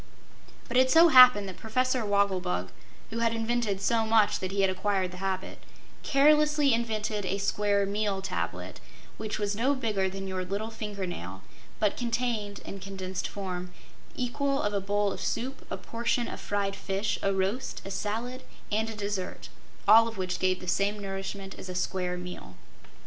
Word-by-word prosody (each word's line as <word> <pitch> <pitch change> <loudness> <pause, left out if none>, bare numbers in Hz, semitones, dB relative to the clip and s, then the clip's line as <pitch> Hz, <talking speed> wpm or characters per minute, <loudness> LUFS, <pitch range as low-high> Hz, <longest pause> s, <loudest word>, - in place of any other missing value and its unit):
But 245 - -1
it 260 0 +5
so 330 +4 +7
happened 250 -7 +8
that 190 - -8
Professor 255 +2 0
Wogglebug 190 - 0 0.4
(who 230 - -3
had 230 0 +1
invented 225 -3 0
so 225 +2 +2
much 220 -1 +3
that 185 0 -3
he 200 0 +1
had 195 - +4
acquired 190 -1 0
the 180 - -9
habit) 190 0 -3 0.4
carelessly 300 -1 +4
invented 215 -2 -1
a 190 +1 -1
Square 200 0 +1
Meal 200 0 -1
Tablet, 90 - -4 0.4
which 215 -1 -3
was 205 -1 -1
no 260 +6 +2
bigger 210 -7 0
than 195 +1 -6
your 185 -1 -2
little 200 +5 -3
finger 210 -3 -4
nail 95 - -7 0.4
but 210 -2 +1
contained, 235 -4 -2
in 195 - -7
condensed 190 -1 -4
form, 180 -2 -5 0.4
the - - -2
equal 275 +3 0
of 205 - 0
a 200 - 0
bowl 205 +1 +1
of - - -7
soup, 260 +4 -3
a - - -3
portion 235 +1 -1
of - - -7
fried 200 -1 -1
fish, 195 +2 -2
a 195 - +1
roast, 195 +6 -2
a 195 - -6
salad 230 +6 -3 0.3
and 220 +2 +1
a 220 - -6
dessert, 200 -3 -4 0.4
all 225 +2 +8
of 225 -2 -7
which 185 -1 -2
gave 185 0 +1
the 180 - -9
same 200 +3 +1
nourishment 195 0 -5
as 185 - -8
a 180 - -5
square 180 0 -1
meal. 180 0 -8
205 Hz, 175 wpm, -28 LUFS, 190-230 Hz, 0.4 s, happened